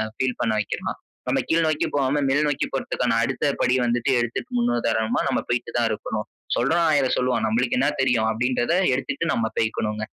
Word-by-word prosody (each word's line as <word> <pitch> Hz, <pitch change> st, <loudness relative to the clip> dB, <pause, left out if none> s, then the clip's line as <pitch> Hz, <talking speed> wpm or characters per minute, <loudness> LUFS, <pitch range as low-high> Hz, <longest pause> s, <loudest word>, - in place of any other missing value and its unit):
Feel 130 Hz, 0 st, -1 dB
பண்ண 115 Hz, -, +1 dB
வைக்கிறான். -, -, -4 dB, 0.3 s
நம்ம 125 Hz, +2 st, +1 dB
கீழ் 165 Hz, 0 st, +3 dB
நோக்கி 155 Hz, -1 st, +1 dB
போகாம 140 Hz, +1 st, +1 dB
மேல் 145 Hz, +2 st, +2 dB
நோக்கி 145 Hz, -, 0 dB
போறதுக்கான 125 Hz, -2 st, -1 dB
அடுத்த 135 Hz, +4 st, -1 dB, 0.2 s
படி 125 Hz, -, +3 dB
வந்துட்டு 120 Hz, +3 st, +1 dB
எடுத்துட்டு 120 Hz, -, -3 dB
முன்னுதாரணமா 115 Hz, -, +1 dB
நம்ம -, -, +1 dB
போய்ட்டு 120 Hz, 0 st, -1 dB
தான் 115 Hz, -1 st, +2 dB
இருக்கணும். 105 Hz, 0 st, -4 dB, 0.3 s
சொல்றவ 160 Hz, +8 st, +2 dB
1000 145 Hz, -3 st, +3 dB
சொல்லுவான் 125 Hz, -3 st, +1 dB
நம்மளுக்கு 120 Hz, +3 st, +1 dB
என்னா 135 Hz, +3 st, +3 dB
தெரியும்," 125 Hz, -4 st, +2 dB
அப்படிங்கறத 125 Hz, +5 st, 0 dB, 0.2 s
எடுத்துட்டு 135 Hz, +4 st, -2 dB
நாம 110 Hz, -1 st, 0 dB
போய்க்கணும்ங்க. 110 Hz, -1 st, -1 dB
125 Hz, 170 wpm, -23 LUFS, 115-135 Hz, 0.3 s, கீழ்